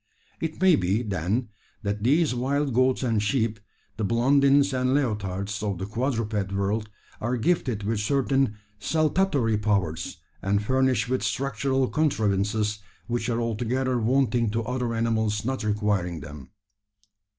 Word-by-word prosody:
It 160 Hz, -1 st, -4 dB
may 185 Hz, -3 st, +6 dB
be, 100 Hz, +1 st, 0 dB
then, 105 Hz, +4 st, -1 dB, 0.3 s
that 100 Hz, +1 st, -2 dB
these 145 Hz, +3 st, +3 dB
wild 135 Hz, +2 st, 0 dB
goats 130 Hz, +2 st, +2 dB
and 115 Hz, -4 st, +1 dB
sheep 110 Hz, 0 st, 0 dB, 0.4 s
the 110 Hz, -, -2 dB
Blondins 140 Hz, +5 st, +4 dB
and 130 Hz, +1 st, +1 dB
Leotards 105 Hz, -6 st, -1 dB
of 100 Hz, -3 st, -2 dB
the 95 Hz, -, -4 dB
quadruped 110 Hz, -3 st, -2 dB
world 100 Hz, +2 st, -1 dB, 0.3 s
are 120 Hz, +3 st, -1 dB
gifted 120 Hz, -5 st, 0 dB
with 110 Hz, +1 st, -1 dB
certain 135 Hz, 0 st, +1 dB, 0.2 s
saltatory 155 Hz, -, +1 dB
powers, 95 Hz, -7 st, -1 dB, 0.2 s
and 100 Hz, +1 st, +1 dB
furnished 130 Hz, +1 st, +2 dB
with 130 Hz, +1 st, 0 dB
structural 135 Hz, -1 st, 0 dB
contrivances 105 Hz, -7 st, 0 dB, 0.3 s
which 120 Hz, -1 st, -2 dB
are 115 Hz, -1 st, 0 dB
altogether 120 Hz, +3 st, -1 dB
wanting 120 Hz, -1 st, +2 dB
to 115 Hz, +2 st, -1 dB
other 125 Hz, 0 st, -2 dB
animals 110 Hz, -2 st, 0 dB
not 130 Hz, -1 st, -2 dB
requiring 105 Hz, -5 st, 0 dB
them. 70 Hz, -3 st, -10 dB
115 Hz, 135 wpm, -26 LUFS, 105-130 Hz, 0.4 s, may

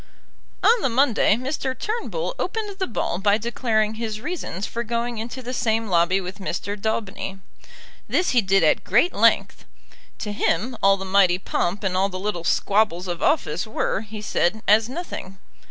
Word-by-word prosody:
On 465 Hz, 0 st, +5 dB
the 270 Hz, -, +1 dB
Monday 245 Hz, -4 st, +3 dB
Mr. 260 Hz, +1 st, -3 dB
Turnbull 475 Hz, +3 st, -3 dB
opened 410 Hz, 0 st, -3 dB
the 375 Hz, -, 0 dB
ball 200 Hz, -6 st, -2 dB
by 205 Hz, +1 st, +3 dB
declaring 220 Hz, -1 st, 0 dB
his 220 Hz, -1 st, -4 dB
reasons 215 Hz, -, -4 dB
for 235 Hz, -, -4 dB
going 235 Hz, 0 st, -2 dB
into 240 Hz, +3 st, -6 dB
the 250 Hz, +1 st, -5 dB
same 225 Hz, -2 st, 0 dB
lobby 175 Hz, +2 st, +3 dB
with 185 Hz, +2 st, -7 dB
Mr. 195 Hz, +1 st, -3 dB
Daubeny. 210 Hz, -2 st, -3 dB, 0.7 s
This 360 Hz, -, +1 dB
he 245 Hz, -, +4 dB
did 195 Hz, -2 st, +3 dB
at 155 Hz, -, +3 dB
great 245 Hz, -, +3 dB
length. -, -, +2 dB, 0.5 s
To 210 Hz, -, -4 dB
him 240 Hz, +4 st, 0 dB
all 195 Hz, 0 st, +5 dB
the 190 Hz, -, -6 dB
mighty 190 Hz, -2 st, +4 dB
pomp 190 Hz, +1 st, -2 dB
and 190 Hz, -2 st, 0 dB
all 195 Hz, +2 st, +2 dB
the 185 Hz, -, -5 dB
little 185 Hz, -3 st, -3 dB
squabbles 195 Hz, -1 st, +1 dB
of 175 Hz, -1 st, -4 dB
office 175 Hz, -, +1 dB
were, 215 Hz, -2 st, -1 dB
he 215 Hz, -1 st, -8 dB
said, 215 Hz, +1 st, 0 dB
as 215 Hz, +2 st, +5 dB
nothing. 255 Hz, -, -6 dB
215 Hz, 170 wpm, -23 LUFS, 195-245 Hz, 0.7 s, On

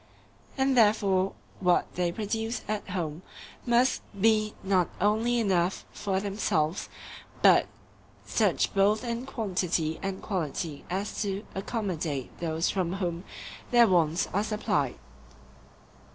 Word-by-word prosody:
And 265 Hz, 0 st, +2 dB
therefore 200 Hz, -4 st, +3 dB, 0.3 s
what 180 Hz, -2 st, +2 dB
they 175 Hz, -1 st, 0 dB
produce 225 Hz, +4 st, -3 dB
at 210 Hz, -1 st, -3 dB
home 170 Hz, -4 st, -3 dB, 0.5 s
must 240 Hz, +2 st, +3 dB, 0.2 s
be 215 Hz, 0 st, +3 dB
not 190 Hz, -3 st, +2 dB
only 225 Hz, +4 st, +2 dB
enough 190 Hz, -4 st, +1 dB
for 195 Hz, -2 st, -1 dB
themselves, 195 Hz, -5 st, -1 dB, 0.5 s
but -, -, +6 dB, 0.6 s
such -, -, +1 dB
both 205 Hz, +3 st, +3 dB
in 240 Hz, +1 st, -3 dB
quantity 180 Hz, -9 st, -1 dB
and 195 Hz, -1 st, -3 dB
quality 160 Hz, -5 st, -3 dB
as 195 Hz, +3 st, -3 dB
to 200 Hz, 0 st, -2 dB
accommodate 180 Hz, -, -3 dB
those 165 Hz, 0 st, 0 dB
from 185 Hz, -2 st, 0 dB
whom 175 Hz, -2 st, -3 dB, 0.4 s
their 240 Hz, -2 st, +6 dB
wants 170 Hz, -3 st, +2 dB
are 205 Hz, -, +2 dB
supplied. 180 Hz, -, 0 dB
195 Hz, 115 wpm, -28 LUFS, 175-215 Hz, 0.6 s, but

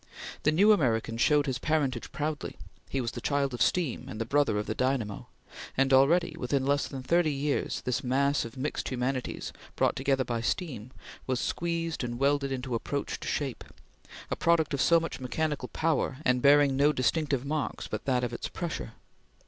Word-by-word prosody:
The 155 Hz, -, +3 dB
new 200 Hz, +7 st, +5 dB
American 115 Hz, -, +2 dB
showed 145 Hz, +4 st, +3 dB
his 130 Hz, -3 st, -2 dB
parentage 140 Hz, -6 st, -1 dB
proudly; 150 Hz, 0 st, -3 dB, 0.3 s
he 135 Hz, -, -1 dB
was 120 Hz, -2 st, -2 dB
the -, -, -7 dB
child 140 Hz, -2 st, 0 dB
of 120 Hz, -, -5 dB
steam 170 Hz, -9 st, +1 dB
and 110 Hz, -, -6 dB
the 115 Hz, -, -1 dB
brother 140 Hz, -4 st, +2 dB
of 105 Hz, -, -1 dB
the -, -, -2 dB
dynamo, 125 Hz, -6 st, -1 dB, 0.5 s
and 135 Hz, 0 st, +3 dB
already, 155 Hz, +5 st, +4 dB
within 130 Hz, +1 st, 0 dB
less 140 Hz, +1 st, +1 dB
than 135 Hz, -2 st, -7 dB
thirty 165 Hz, +3 st, +2 dB
years, 140 Hz, +1 st, -1 dB
this 125 Hz, -2 st, -1 dB
mass 140 Hz, +3 st, +2 dB
of 115 Hz, +2 st, -9 dB
mixed 140 Hz, +4 st, -2 dB
humanities, 130 Hz, 0 st, -3 dB, 0.2 s
brought -, -, +2 dB
together 135 Hz, 0 st, +1 dB
by 120 Hz, -2 st, -2 dB
steam, 125 Hz, -, -3 dB, 0.4 s
was 130 Hz, -2 st, 0 dB
squeezed 165 Hz, -1 st, -2 dB
and 120 Hz, -1 st, -3 dB
welded 140 Hz, +1 st, +1 dB
into 130 Hz, -1 st, -3 dB
approach 95 Hz, -9 st, -3 dB
to -, -, -7 dB
shape; -, -, -2 dB, 0.7 s
a -, -, +1 dB
product 165 Hz, -3 st, +2 dB
of 140 Hz, -, 0 dB
so 170 Hz, 0 st, +5 dB
much 165 Hz, -, -5 dB
mechanical 145 Hz, +1 st, -2 dB
power, 155 Hz, -4 st, 0 dB
and 125 Hz, 0 st, +3 dB
bearing 145 Hz, 0 st, +5 dB
no 145 Hz, +2 st, +4 dB
distinctive 140 Hz, 0 st, 0 dB
marks 150 Hz, +1 st, -2 dB
but -, -, -5 dB
that 125 Hz, -2 st, +1 dB
of 120 Hz, -1 st, -2 dB
its -, -, -4 dB
pressure. 170 Hz, -10 st, -5 dB
135 Hz, 185 wpm, -29 LUFS, 125-150 Hz, 0.7 s, new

